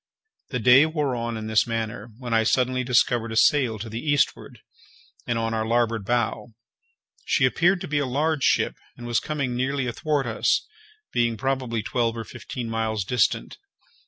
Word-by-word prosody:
The 125 - -2
day 125 +6 +6
wore 150 -5 -1
on 115 -1 -3
in 110 - -6
this 110 +2 +2
manner, 115 -1 -4
when 120 -2 -5
I 115 - +4
suddenly 130 +2 +1
discovered 120 -2 +2
a - - -4
sail 125 -1 +3
to 110 +2 -6
the 110 +1 -5
eastward, 145 0 0 0.7
and 120 - 0
on 115 0 -1
our 110 -1 0
larboard 115 -2 0
bow. 120 0 -1 0.7
She 130 - +2
appeared 175 +8 +2
to 185 - -5
be 145 -1 0
a 145 - 0
large 150 +3 0
ship, - - +2 0.2
and 120 - -9
was 120 -1 +1
coming 140 -5 -3
nearly 135 +2 -1
athwart 145 +3 -1
us, 115 -2 +1 0.5
being 120 -1 +1
probably 130 -4 -2
twelve 115 0 -1
or 115 - -4
fifteen 120 +1 -7
miles 110 -3 -2
distant. 115 0 0
120 Hz, 175 wpm, -24 LUFS, 115-135 Hz, 0.7 s, day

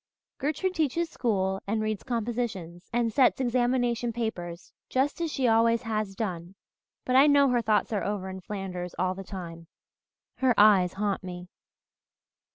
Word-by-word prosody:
Gertrude 315 +6 -1
teaches 325 0 0
school 190 -5 -1
and 220 +2 0
reads 215 -1 -2
compositions 225 -8 -4
and 235 -2 0
sets 260 +1 +4
examination 245 -1 +1
papers 190 -7 -5 0.2
just 275 +6 0
as 330 -2 -1
she 260 -3 0
always 230 +1 +3
has 215 -3 -2
done, 180 -3 -4 0.5
but 255 - 0
I 275 +3 +7
know 285 -1 +5
her 245 -1 +2
thoughts 215 0 +1
are 205 - 0
over 200 -2 -3
in 190 0 -7
Flanders 180 -3 -5
all 185 0 +1
the 195 +1 -8
time. 170 -4 -8 0.7
Her 260 -3 +2
eyes 200 -4 +6
haunt 200 -1 -2
me. 180 -1 -8
220 Hz, 155 wpm, -27 LUFS, 190-245 Hz, 0.7 s, I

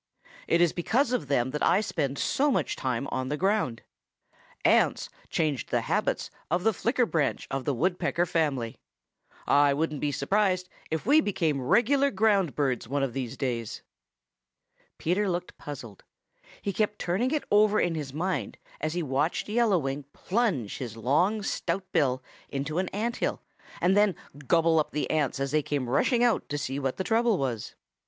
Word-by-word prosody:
It 170 - +3
is 175 -2 +4
because 235 - +1
of 160 - -1
them 130 -2 +1
that 150 - -3
I 190 - +4
spend 160 -10 -2
so 285 - +1
much 270 - 0
time 130 0 -2
on 130 0 -2
the 150 - -1
ground. 190 - 0 0.8
Ants - - +3 0.2
changed 150 -6 -1
the - - +1
habits - - -1 0.2
of 175 +3 0
the 225 +1 +3
Flicker 240 +4 +1
branch 160 -9 -1
of 135 -1 -2
the 145 - +1
Woodpecker 175 +3 +1
family. 140 -9 -1 0.7
I 145 -1 +4
wouldn't 150 -1 -1
be 145 - 0
surprised 185 +6 +1 0.2
if 160 +1 -2
we 295 +6 +6
became 165 - 0
regular 270 - +3
ground 200 - +2
birds 130 -5 0
one 140 +2 0
of 130 -3 -2
these 130 -4 -4
days." 120 -5 -3 1.1
Peter 190 +5 0
looked 180 0 -3
puzzled. 120 -9 -8 0.6
He 200 - -1
kept 210 0 0
turning 190 +9 0
it 300 +1 -1
over 210 0 +5
in 175 - +1
his 150 -4 -4
mind 180 +6 -2 0.2
as 155 +2 -2
he 175 - -1
watched 145 +3 0
Yellow 220 -3 +3
Wing 135 -2 -3
plunge 185 - -1
his 115 -4 -6
long 175 - +1
stout 185 0 -2
bill 130 -6 +1 0.3
into 145 +4 -2
an 185 - -1
ant 230 +4 -2
hill - - -2 0.4
and 185 +2 +3
then 205 -3 +4 0.3
gobble 165 -1 +4
up 150 - 0
the 150 - -1
ants 145 -3 0
as 135 0 -1
they 155 0 +3
came 140 -3 -2
rushing 235 - +2
out 240 -2 +2
to 145 - -2
see 140 -1 -3
what 135 -2 -2
the 190 - -1
trouble 225 +1 +2
was. 125 -7 -3
160 Hz, 175 wpm, -27 LUFS, 135-200 Hz, 1.1 s, we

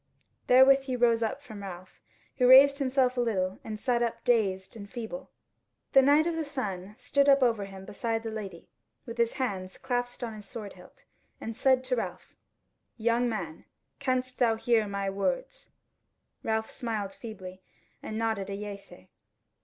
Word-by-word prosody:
Therewith 270 +2 +6
he 260 -2 -2
rose 235 -2 +3
up 230 +5 -2
from 220 -6 -9
Ralph, 185 -1 -9 0.4
who 250 -2 +4
raised 280 +2 +8
himself 260 -2 +1
a - - +3
little, 190 -5 -1
and 215 -1 -6
sat 245 -1 +1
up 235 -1 -2
dazed 195 -5 +1
and 200 -2 -9
feeble. 240 +3 -7 0.6
The 270 - +8
Knight 290 +3 +5
of 340 -1 -1
the 325 - -1
Sun 210 -9 -5
stood 280 +2 +2
up 275 -1 +6
over 225 -5 +2
him 195 -1 -10
beside 225 +2 -2
the 225 - -4
lady 195 -6 -7 0.4
with 230 0 -8
his 235 -1 +2
hands 190 -8 -3
clasped 245 0 -3
on 230 -2 -4
his 210 -2 -11
sword 210 -2 -7
hilt, 180 -1 -17 0.4
and 225 - -6
said 260 +1 +3
to 255 0 0
Ralph: - - -5 0.6
"Young 235 +1 +1
man, 175 -8 -5 0.3
canst 255 -2 -1
thou 230 -2 +4
hear 225 -1 +2
my 200 0 -3
words?" - - -2 0.7
Ralph 220 0 -1
smiled 215 -5 -4
feebly 185 -5 -9 0.4
and 215 - -5
nodded 220 -3 -1
a 200 - -3
yea 205 0 -5
say. 95 - -16
230 Hz, 170 wpm, -29 LUFS, 200-255 Hz, 0.7 s, raised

